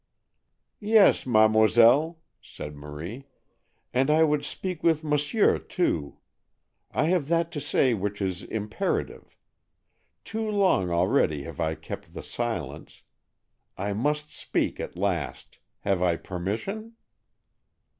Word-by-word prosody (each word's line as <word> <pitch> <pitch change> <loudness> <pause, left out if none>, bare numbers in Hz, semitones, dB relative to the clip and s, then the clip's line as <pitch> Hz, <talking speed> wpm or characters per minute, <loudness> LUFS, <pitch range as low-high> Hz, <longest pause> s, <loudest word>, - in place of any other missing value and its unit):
"Yes, 210 -8 +4
mademoiselle," 115 +7 +5 0.2
said 75 0 -9
Marie, 80 - -8 0.7
"and 130 +3 +2
I 155 +1 +5
would 150 -2 +2
speak 180 +2 -5
with 160 -2 +2
monsieur 150 +8 +2
too. 80 - -2 0.7
I - - 0
have 175 -6 +1
that 170 0 +1
to 145 - -4
say 130 -2 +2
which 105 -1 -3
is 95 -2 -2
imperative. 110 - -3 0.9
Too 220 0 -3
long 190 - +2
already 85 -4 +2
have - - -9
I 80 0 0
kept - - -9
the - - -6
silence. - - -5 0.7
I 100 +2 -2
must 150 +7 -1
speak - - -1
at - - -6
last. 90 -7 -3 0.2
Have 95 -3 0
I 90 -2 +3
permission?" 110 - -4
120 Hz, 115 wpm, -26 LUFS, -, 0.9 s, mademoiselle